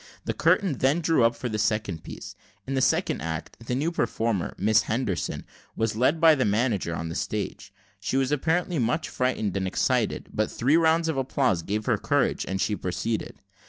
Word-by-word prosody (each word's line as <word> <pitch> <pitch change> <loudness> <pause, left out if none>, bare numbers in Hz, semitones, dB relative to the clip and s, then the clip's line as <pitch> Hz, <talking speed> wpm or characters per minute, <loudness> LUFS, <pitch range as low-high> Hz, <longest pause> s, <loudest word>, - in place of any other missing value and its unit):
The - - -1
curtain 185 - +2
then 140 +6 +3
drew 165 -6 +2
up 115 +1 +3
for 125 - -4
the 110 -2 -3
second 105 -6 -1
piece. - - -8 0.3
In 135 - -4
the 135 - +1
second - - +1
act, 80 0 -5
the 125 +2 -2
new 150 +6 0
performer, 115 - -1
a - - -21
Miss 110 +3 +4
Henderson, 110 -6 -2 0.3
was 110 -1 -1
led 130 +8 +2
by 165 -1 +7
the 135 -4 +1
manager 105 -5 0
on 80 +1 -4
the - - -4
stage; - - -4 0.3
she 130 - -1
was 135 0 +1
apparently 165 +3 0
much 125 +7 0
frightened 120 -6 -1
and 95 -1 -1
excited, - - 0
but 110 - 0
three 135 +6 +2
rounds 165 0 +3
of 160 -4 -1
applause 130 -8 +1
gave 105 +5 -3
her - - +1
courage, - - +1
and 95 0 -2
she 105 - +1
proceeded. 105 +5 -3
120 Hz, 195 wpm, -26 LUFS, 105-140 Hz, 0.3 s, by